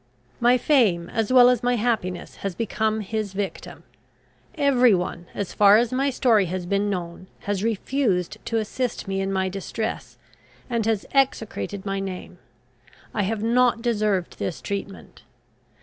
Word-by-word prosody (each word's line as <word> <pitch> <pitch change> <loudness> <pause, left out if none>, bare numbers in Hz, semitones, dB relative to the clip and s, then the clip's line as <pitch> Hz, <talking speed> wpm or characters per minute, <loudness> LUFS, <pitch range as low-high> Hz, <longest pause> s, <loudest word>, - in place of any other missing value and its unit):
My 245 +1 +5
fame, 215 - +2
as 225 0 -1
well 250 -1 +8
as 250 -2 +3
my 245 0 +1
happiness, 215 -6 -2
has 195 -3 -4
become 220 -1 -1
his 210 -1 -3
victim. 195 0 -5 0.7
Every 255 - +4
one, 175 -1 -4
as 200 - -4
far 205 0 +6
as 240 +2 +1
my 270 +2 +1
story 235 -6 +3
has 180 +1 -4
been 200 +3 0
known, 180 -1 -5
has 205 -1 -2
refused 220 -4 -1
to 230 - -1
assist 225 +1 -3
me 195 0 -1
in 195 0 -2
my 190 -1 0
distress, 195 +4 -5 0.5
and 230 -2 0
has 220 -3 0
execrated 225 -7 0
my 195 -1 -2
name. 185 -2 -6 0.7
I - - 0
have 210 +2 -2
not 235 0 +2
deserved 210 -6 0
this 170 - -3
treatment. 200 -1 -6
210 Hz, 150 wpm, -24 LUFS, 195-240 Hz, 0.7 s, well